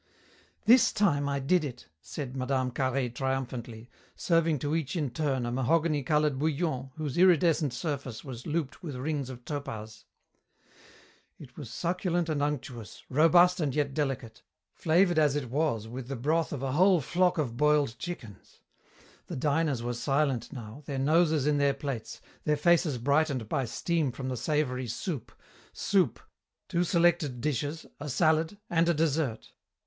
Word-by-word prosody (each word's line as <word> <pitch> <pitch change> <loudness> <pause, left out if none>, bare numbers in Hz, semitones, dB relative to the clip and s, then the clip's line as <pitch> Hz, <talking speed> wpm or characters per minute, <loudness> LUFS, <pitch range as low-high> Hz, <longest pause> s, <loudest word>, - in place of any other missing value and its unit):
"This 240 +3 +6
time 145 -9 +1
I 140 - 0
did 155 +6 +2
it!" 125 - -7
said 135 -4 -6
Mme. 130 -1 -1
Carhaix 130 -1 -1
triumphantly, 125 -3 -4 0.3
serving 165 -2 +2
to 145 +3 -1
each 165 0 -2
in 150 -7 -1
turn 135 -2 -1
a 120 - -2
mahogany 150 +4 +1
colour 150 +2 +2
bouillon 140 -1 -1
whose 155 -1 -3
iridescent 165 -5 +4
surface 135 -3 -4
was 125 -3 -8
looped 155 -3 -2
with 155 -7 -6
rings 140 0 -2
of 125 -1 -10
topaz. 115 -7 -6 1.3
It 130 -4 -13
was 140 -7 -8
succulent 175 +4 -1
and 150 -2 0
unctuous, 130 -6 -4
robust 175 +5 +5
and 145 -5 -1
yet 145 -2 0
delicate, 135 -6 -3 0.3
flavoured 175 +1 +3
as 150 -2 +3
it 130 -5 -3
was 130 -7 0
with 120 +2 -7
the 135 - -4
broth 155 +7 0
of 135 -3 -4
a 135 - -1
whole 180 +5 +5
flock 180 +5 +1
of 130 -7 -1
boiled 150 -3 +2
chickens. 125 - -8 0.7
The - - -5
diners 145 -2 0
were 120 0 -2
silent 135 -1 0
now, 120 -1 -8
their 140 - -3
noses 155 +1 +3
in 150 -1 +2
their 140 -1 +2
plates, 115 -5 -5 0.2
their 150 -1 +1
faces 160 -3 +3
brightened 140 -1 +1
by 130 +4 -1
steam 155 +4 -1
from 130 +1 -5
the 130 - -2
savoury 130 -2 -1
soup, 120 - -4 0.4
soup, 185 - +1 0.5
two 170 - +1
selected 170 -7 +2
dishes, 145 +4 -2
a 145 +1 -5
salad, 160 +6 +2
and 170 0 +2
a 170 - +3
dessert. 150 -6 -1
145 Hz, 155 wpm, -29 LUFS, 130-160 Hz, 1.3 s, This